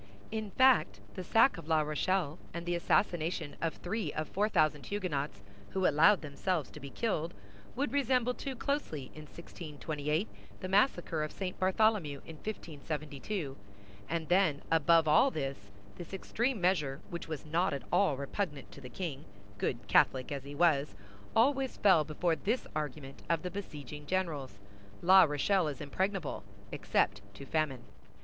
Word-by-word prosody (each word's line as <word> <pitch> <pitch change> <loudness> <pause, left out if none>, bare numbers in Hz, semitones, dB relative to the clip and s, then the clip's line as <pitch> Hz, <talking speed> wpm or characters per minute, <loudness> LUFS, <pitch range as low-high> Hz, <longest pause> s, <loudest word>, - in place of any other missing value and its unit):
In 220 -1 -3
fact, 230 - +4
the 185 - -5
sack 225 +2 +4
of 160 - -11
La 160 -1 +3
Rochelle, 155 +2 0 0.2
and 170 0 -4
the 175 - 0
assassination 170 -3 0
of 165 -2 -1
three 190 -3 -3
of 155 0 -3
four 210 +2 +1
thousand 155 -7 +2
Huguenots 145 - -3 0.3
who 190 -1 +1
allowed 165 +6 +5
themselves 155 +1 -2
to - - -10
be 140 -1 -8
killed, 170 - -2 0.4
would 280 +3 -1
resemble 255 -3 +2
too 270 +1 -5
closely, 230 - -3
in 155 0 -10
1628, 155 +1 -4 0.3
the 185 - -4
massacre 185 - +2
of 155 - -4
St. 185 -2 -5
Bartholomew 190 -6 +2
in 160 - -10
1572; 150 -3 -5 0.5
and 165 0 -2
then, 175 -6 +3
above 165 0 +5
all 155 - +6
this, 135 - -5 0.3
this 175 +2 -7
extreme 235 +5 -1
measure, 155 -7 +1
which 170 -1 -5
was 155 -3 -5
not 165 +4 +1
at 140 -2 -4
all 185 -9 +3
repugnant 145 +1 -4
to 140 - -12
the 125 - -9
king, 150 -1 -5 0.3
good - - -2
Catholic 130 0 +3
as 140 -1 -4
he 145 +1 -8
was, 150 -3 +2 0.4
always 265 +3 +2
fell 185 -6 +5
before 160 +3 0
this 225 +9 -1
argument 145 -2 -5
of 170 -2 +1
the 180 - -3
besieging 150 -6 -7
generals—La 135 - +2
Rochelle 160 +4 +1
is 145 -4 -4
impregnable 185 - -2 0.3
except 100 0 0
to 140 - -9
famine. 145 -4 -1
160 Hz, 155 wpm, -32 LUFS, 145-190 Hz, 0.5 s, all